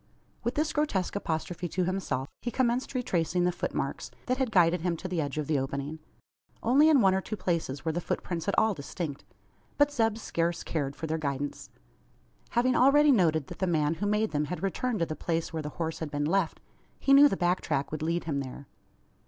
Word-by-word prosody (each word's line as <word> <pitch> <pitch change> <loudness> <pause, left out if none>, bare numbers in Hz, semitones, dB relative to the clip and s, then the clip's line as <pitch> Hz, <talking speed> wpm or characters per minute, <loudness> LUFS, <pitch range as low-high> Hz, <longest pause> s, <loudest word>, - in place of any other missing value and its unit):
With 235 +3 -1
this 305 +1 0
grotesque 250 - 0
apostrophe 175 -1 -3
to 180 +3 -1
himself, 175 -8 -2
he 245 - -2
commenced 250 +1 0
retracing 180 -7 0
the 180 - +3
footmarks - - -3 0.2
that 255 +1 0
had 260 -3 +1
guided 175 -4 +4
him 170 -1 -1
to 185 - -5
the 180 -3 -1
edge 145 -1 -4
of 150 - -1
the 150 -1 +1
opening. 140 +3 -4 0.6
Only 280 +7 +5
in 290 -5 +6
one 190 -2 +5
or 190 - +1
two 215 - -5
places 165 -7 -2
were 160 - +1
the 175 +2 -2
footprints 170 0 -3
at 200 - 0
all 220 -1 +4
distinct. 145 -1 -5 0.5
But 290 0 +4
Zeb 225 -5 +1
scarce 170 -6 -1
cared 140 -4 -2
for - - -5
their 160 0 -2
guidance. 145 -1 -3 0.8
Having 245 +1 +2
already 290 +3 +6
noted 160 - +3
that - - -10
the 190 - +1
man 155 -3 +2
who 180 +5 -2
made 210 +1 +1
them 150 0 0
had 180 +5 -5
returned 225 +5 -1
to - - +3
the 155 - -5
place 165 +2 -2
where 160 - -2
the 150 - -5
horse 160 +1 -4
had 160 - -4
been 145 0 -1
left, 175 +1 +1 0.4
he 275 - +3
knew 285 +1 +9
the 195 - -2
back 175 +1 +1
track 145 -3 -1
would 155 0 -4
lead 165 +2 0
him 150 -4 -2
there. 135 +1 -7
175 Hz, 215 wpm, -29 LUFS, 155-220 Hz, 0.8 s, knew